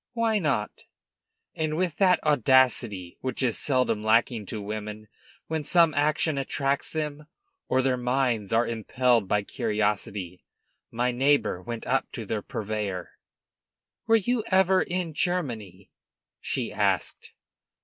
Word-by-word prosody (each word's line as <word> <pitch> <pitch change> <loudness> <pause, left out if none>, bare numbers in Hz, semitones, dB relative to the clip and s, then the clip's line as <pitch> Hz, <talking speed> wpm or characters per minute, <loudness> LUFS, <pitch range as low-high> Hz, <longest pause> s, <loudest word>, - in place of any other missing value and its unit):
"Why 230 -2 +1
not?" 135 - -2 0.7
And 155 -1 -2
with 175 -4 -1
that 185 -2 +4
audacity 125 - +2
which 130 0 -2
is 120 -4 +1
seldom 130 -6 +1
lacking 110 -1 +2
to 110 - -5
women 105 +1 -6 0.4
when 160 -1 -3
some 165 +1 +4
action 150 0 +1
attracts 140 +1 -1
them, 150 -1 -4 0.4
or 130 0 +2
their 130 -1 +1
minds 125 -4 0
are 115 +1 +3
impelled 115 0 +1
by 105 +1 +1
curiosity, 105 -5 -2 0.5
my 120 +2 0
neighbor 135 -7 +2
went 115 +3 -6
up - - 0
to - - -5
the - - -2
purveyor. 105 -4 -4 1.0
"Were 225 - +5
you 225 +2 +1
ever 190 0 +4
in 175 -2 -2
Germany?" 135 - -3 0.5
she - - -3
asked. - - -1
130 Hz, 130 wpm, -26 LUFS, 110-155 Hz, 1.0 s, Were